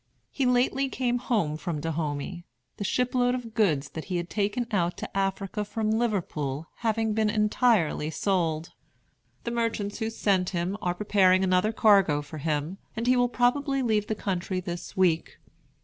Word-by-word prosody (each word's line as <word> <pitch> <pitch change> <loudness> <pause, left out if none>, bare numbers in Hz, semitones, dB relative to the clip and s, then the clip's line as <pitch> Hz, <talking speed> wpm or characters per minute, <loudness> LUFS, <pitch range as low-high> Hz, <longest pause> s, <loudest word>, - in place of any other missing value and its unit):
He 270 -3 0
lately 255 +2 +2
came 245 -2 0
home 205 -12 0
from 165 -2 -3
Dahomey, 160 +2 -3 0.3
the - - -3
ship 250 +5 0
load 245 0 +2
of 235 -3 -6
goods 160 -11 +1
that 160 - -7
he 180 -1 -2
had 175 0 -4
taken 210 +3 0
out 175 -4 0
to - - -7
Africa 195 +1 -1
from 215 +1 -2
Liverpool 170 - -1
having 225 -1 0
been 215 0 +2
entirely 210 -7 +2
sold. 165 -2 -1 0.7
The 235 - -3
merchants 230 -3 -2
who 220 -1 -1
sent 195 -5 +1
him 175 +3 -1
are 175 0 -1
preparing 190 -2 +3
another 185 +3 +2
cargo 195 -10 +4
for 150 +2 -8
him, 155 +5 -2 0.2
and 230 - -2
he 250 +1 +4
will 245 0 +3
probably 270 +3 +1
leave 215 -3 +1
the 220 - -1
country 185 -2 -2
this 175 -1 -6
week. 170 -3 +1
200 Hz, 165 wpm, -27 LUFS, 175-230 Hz, 0.7 s, cargo